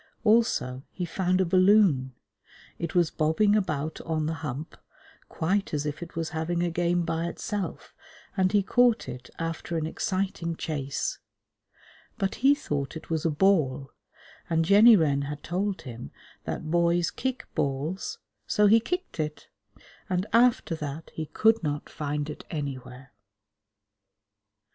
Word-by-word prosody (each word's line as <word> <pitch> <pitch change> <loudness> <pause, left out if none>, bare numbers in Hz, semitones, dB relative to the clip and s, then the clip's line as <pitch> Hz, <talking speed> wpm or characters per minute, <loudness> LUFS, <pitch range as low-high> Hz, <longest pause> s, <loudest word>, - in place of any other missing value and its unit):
Also 210 - +2
he 180 - -4
found 185 +2 0
a 190 - +3
balloon. 185 - +4 0.6
It 170 0 -4
was 175 -3 +3
bobbing 160 +7 +2
about 160 -7 -1
on 160 -2 -1
the 160 - -1
Hump, 150 +2 -5 0.5
quite 190 +1 0
as 145 0 -2
if 150 +1 -4
it 170 - -8
was 165 -1 -2
having 170 +2 -1
a 175 - 0
game 175 +1 +1
by 165 0 -1
itself, 195 0 -5 0.4
and 185 -1 +2
he 205 -1 +3
caught 245 +2 +3
it 125 0 -8
after 165 0 -3
an 155 - -1
exciting 180 0 -2
chase. 140 -4 -3 1.0
But 195 -3 -1
he 275 +2 +6
thought 145 - -3
it 160 - -12
was 160 -1 -1
a - - +4
ball, 150 -5 +2 0.6
and 165 0 +2
Jenny 210 +5 +8
Wren 145 -6 +2
had 145 +1 -5
told 190 +3 -2
him 115 - -8 0.4
that 155 - -4
boys 170 0 +2
kick 260 -1 -3
balls, 155 - -2 0.3
so 210 - +3
he 220 +3 +7
kicked 360 - -4
it; 150 -1 -4 0.6
and 185 +1 0
after 235 -6 +4
that 150 +1 -6
he 160 -1 -4
could 225 +6 +3
not 145 -2 -3
find 150 -1 -3
it 150 - -7
anywhere. 135 -3 -6
165 Hz, 145 wpm, -27 LUFS, 150-195 Hz, 1.0 s, Jenny